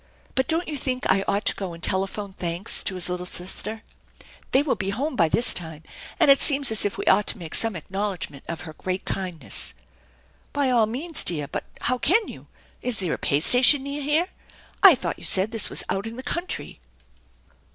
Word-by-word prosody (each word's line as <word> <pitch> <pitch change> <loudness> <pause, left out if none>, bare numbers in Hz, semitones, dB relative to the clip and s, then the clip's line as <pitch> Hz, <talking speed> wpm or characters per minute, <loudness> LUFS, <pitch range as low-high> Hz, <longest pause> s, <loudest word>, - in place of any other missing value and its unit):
But 260 - 0
don't 330 +2 +1
you 300 - -4
think 255 -1 -3
I 195 0 +2
ought 200 +2 -1
to - - +3
go 190 -3 -6
and 165 - -16
telephone 195 +1 -2
thanks 175 +3 -1
to 190 - -2
his 180 - -1
little 180 0 -4
sister? 215 +5 -4 0.7
They 265 - +3
will 295 - 0
be 195 -2 -4
home 260 +8 -3
by 170 -7 +2
this 240 +9 +4
time, 160 -2 -2 0.4
and 280 - +6
it 275 - +4
seems 280 -4 +6
as 220 - +3
if 205 - -2
we - - -5
ought 210 - +3
to - - -1
make 165 -4 -9
some 225 -3 +1
acknowl 195 +5 -3
edgment 140 -5 -6
of 170 - -6
her 160 -3 -10
great 185 +4 -5
kindness." 180 -4 -3 0.4
" - - -35
By 280 -2 +1
all 230 -3 +3
means, 290 +9 -1
dear; 150 -5 -2
but - - -6 0.2
how 250 +1 -1
can 425 - +3
you? - - -12 0.3
Is 250 -3 0
there 180 -4 -1
a - - -5
pay 140 - +1
station 255 - +6
near 280 +1 -5
here? 305 +6 +1 0.5
I 390 -6 +9
thought - - -5
you - - -13
said 195 +3 +4
this 225 -3 +2
was - - 0
out 195 +3 -3
in 225 - -8
the 260 - -7
country." 345 +5 -5
210 Hz, 215 wpm, -23 LUFS, 180-270 Hz, 0.7 s, I